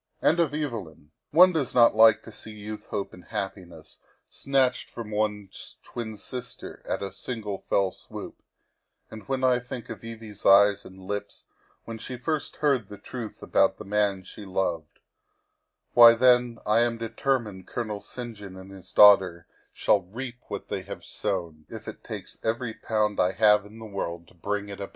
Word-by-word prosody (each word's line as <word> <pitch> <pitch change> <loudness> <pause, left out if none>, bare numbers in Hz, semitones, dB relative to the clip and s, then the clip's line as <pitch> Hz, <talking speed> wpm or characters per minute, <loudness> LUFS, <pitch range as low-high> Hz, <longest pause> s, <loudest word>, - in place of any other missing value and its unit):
And 170 - +3
of 165 -4 +3
Evelyn. 105 - -5 0.2
One 180 +4 +7
does 145 -7 -1
not 120 -1 +7
like 110 0 +6
to 115 - -11
see 110 - -10
youth, 105 0 -8
hope, 100 -2 -4
and 90 - -13
happiness 95 -6 -6 0.3
snatched 130 -2 0
from 115 -3 -8
one's 105 -2 -3
twin 110 -3 -6
sister 125 +4 -8
at - - -2
a 95 -1 -5
single 105 -2 -5
fell 95 -1 +2
swoop, - - -10 0.7
and 110 -1 -10
when 135 -1 -1
I 125 -1 +4
think 125 -1 -8
of 110 - -8
Evie's 115 -3 -9
eyes 100 +1 +6
and 95 - -12
lips 100 +1 -5 0.4
when 115 -1 -7
she 125 +3 -6
first 145 +5 -2
heard 135 -9 +1
the 105 - -9
truth 110 +2 -8
about - - +3
the 110 - -9
man 100 -1 +1
she 105 - -10
loved 95 -5 -2 1.0
why, 115 -1 +9
then 125 -1 +4
I 105 +2 +4
am 120 0 +2
determined 115 -4 -2
Colonel 110 -4 -4
St. 120 +2 -7
John 100 -2 -10
and 95 +1 -11
his 95 -2 -11
daughter 95 -5 +6 0.3
shall 100 - +2
reap 120 +7 -7
what - - -6
they - - -3
have - - -9
sown, 85 -5 -4
if - - -9
it - - -8
takes - - -7
every 115 +1 -1
pound 105 -2 -1
I 90 +1 +3
have 105 0 +4
in 110 +2 -14
the 110 - -9
world 85 -5 -5
to - - -21
bring 100 +3 -3
it 100 - -8
about. 100 - -5
105 Hz, 180 wpm, -26 LUFS, 100-120 Hz, 1.0 s, why